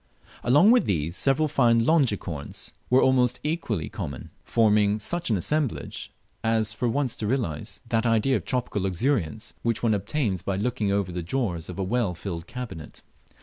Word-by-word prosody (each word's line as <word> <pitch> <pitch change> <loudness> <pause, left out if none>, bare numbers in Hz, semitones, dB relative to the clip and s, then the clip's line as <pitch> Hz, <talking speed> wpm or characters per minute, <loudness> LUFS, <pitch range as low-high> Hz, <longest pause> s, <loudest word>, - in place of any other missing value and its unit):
Along 145 - +6
with 245 0 +5
these, 85 -3 -1
several 140 +6 +2
fine 120 -5 +3
Longicorns 105 - 0 0.2
were 130 +1 +5
almost 125 -2 +3
equally 135 - -2
common, 70 -3 -6
forming 105 -2 +3
such 170 +11 -2
au 110 - +3
assemblage 145 - -2 0.3
as 110 -1 +1
for 120 - -1
once 135 0 0
to 105 - -2
realize 105 - -2
that 115 +1 +1
idea 115 +4 +3
of - - -7
tropical 125 -5 -2
luxuriance 105 - -1
which 115 0 -1
one 115 -2 +3
obtains 105 - -1
by 100 - -2
looking 105 0 -1
over 100 -2 0
the 90 0 -3
drawers 90 -4 -2
of 90 - -7
a 95 - -1
well 105 -2 0
filled 85 -2 -6
cabinet. 120 -11 -8
115 Hz, 165 wpm, -26 LUFS, 95-130 Hz, 0.3 s, Along